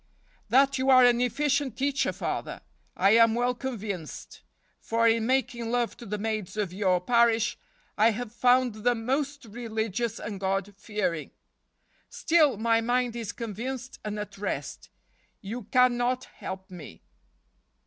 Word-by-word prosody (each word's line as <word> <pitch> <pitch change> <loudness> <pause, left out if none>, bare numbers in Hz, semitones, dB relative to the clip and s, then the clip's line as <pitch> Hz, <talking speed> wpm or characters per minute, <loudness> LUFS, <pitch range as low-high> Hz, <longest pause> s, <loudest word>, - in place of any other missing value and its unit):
" - - -34
That 270 +3 +4
you 260 +1 +1
are 255 -1 +8
an 245 0 +4
efficient 280 0 0
teacher, 275 +1 0
Father, - - -4 0.4
I 195 +1 +4
am 230 0 +5
well 245 +1 +1
convinced; 215 - -6 0.4
for 230 0 +1
in 225 0 +2
making 250 -3 0
love 240 -1 0
to 235 - -10
the 210 +1 -3
maids 215 -2 -3
of 200 -4 -2
your 185 -2 +2
parish 235 +2 +2 0.4
I 220 +2 +6
have 230 0 -4
found 250 0 +3
them 240 -2 +1
most 280 +1 -1
religious 225 0 -3
and 205 -2 -6
God 195 +1 -1
fearing. 195 -6 -3 0.8
Still, 310 -8 +3
my 225 +1 +2
mind 245 0 0
is 225 -4 -4
convinced 240 +4 -6
and 210 0 -4
at 205 -1 -7
rest. 205 - -4 0.5
You 225 +5 -6
can 250 -1 +3
not 250 +1 0
help 190 0 -8
me." 160 - -11
230 Hz, 150 wpm, -27 LUFS, 210-250 Hz, 0.8 s, are